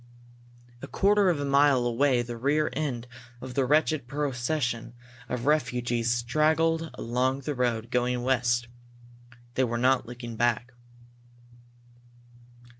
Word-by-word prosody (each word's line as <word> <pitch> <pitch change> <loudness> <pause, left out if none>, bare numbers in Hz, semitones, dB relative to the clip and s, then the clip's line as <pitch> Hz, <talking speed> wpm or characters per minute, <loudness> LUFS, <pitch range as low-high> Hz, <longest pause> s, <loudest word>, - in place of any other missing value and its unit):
A 140 - -7
quarter 200 +3 +3
of 165 -5 0
a 145 - -2
mile 140 -2 +4
away 120 +1 +2
the 120 0 -6
rear 145 +6 +1
end 130 -7 -3 0.3
of 130 0 -8
the 135 -1 +1
wretched 150 -1 +1
procession 125 -3 -2 0.3
of 125 0 -3
refugees 120 -5 0
straggled 155 +7 +1
along 130 +3 -1
the 150 +2 -3
road, 120 -3 -1
going 125 0 0
west. 120 -2 +1 0.9
They 130 - +1
were 120 -1 -1
not 125 0 +2
looking 120 -1 -8
back. 120 +1 0
125 Hz, 120 wpm, -27 LUFS, 120-145 Hz, 0.9 s, mile